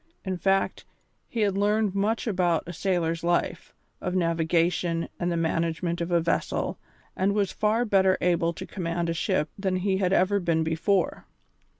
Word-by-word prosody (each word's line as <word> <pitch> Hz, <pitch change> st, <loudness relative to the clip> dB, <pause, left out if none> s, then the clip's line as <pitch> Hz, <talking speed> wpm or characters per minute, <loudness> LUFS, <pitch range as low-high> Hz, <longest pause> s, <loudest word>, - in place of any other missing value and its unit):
In 190 Hz, -1 st, -1 dB
fact, 195 Hz, +2 st, 0 dB, 0.4 s
he 230 Hz, -, -3 dB
had 200 Hz, -2 st, +2 dB
learned 205 Hz, 0 st, +1 dB
much 210 Hz, +3 st, 0 dB
about 180 Hz, -6 st, +1 dB
a 175 Hz, -, -7 dB
sailor's 170 Hz, -2 st, -1 dB
life, 175 Hz, 0 st, 0 dB, 0.3 s
of 180 Hz, -1 st, -2 dB
navigation 165 Hz, 0 st, +1 dB
and 175 Hz, 0 st, 0 dB
the 170 Hz, -, 0 dB
management 165 Hz, +1 st, -1 dB
of 170 Hz, -, -2 dB
a 175 Hz, -1 st, +3 dB
vessel, 165 Hz, 0 st, -1 dB, 0.4 s
and 195 Hz, +2 st, +1 dB
was 200 Hz, -3 st, +1 dB
far 220 Hz, +3 st, +1 dB
better 190 Hz, -3 st, +3 dB
able 170 Hz, -1 st, +2 dB
to -, -, -7 dB
command 170 Hz, -2 st, -3 dB
a -, -, 0 dB
ship 165 Hz, -2 st, 0 dB
than 190 Hz, -2 st, 0 dB
he 190 Hz, +1 st, 0 dB
had 185 Hz, -2 st, +1 dB
ever 195 Hz, +2 st, +3 dB
been 165 Hz, -3 st, +1 dB
before. 165 Hz, +4 st, 0 dB
180 Hz, 170 wpm, -26 LUFS, 170-195 Hz, 0.4 s, a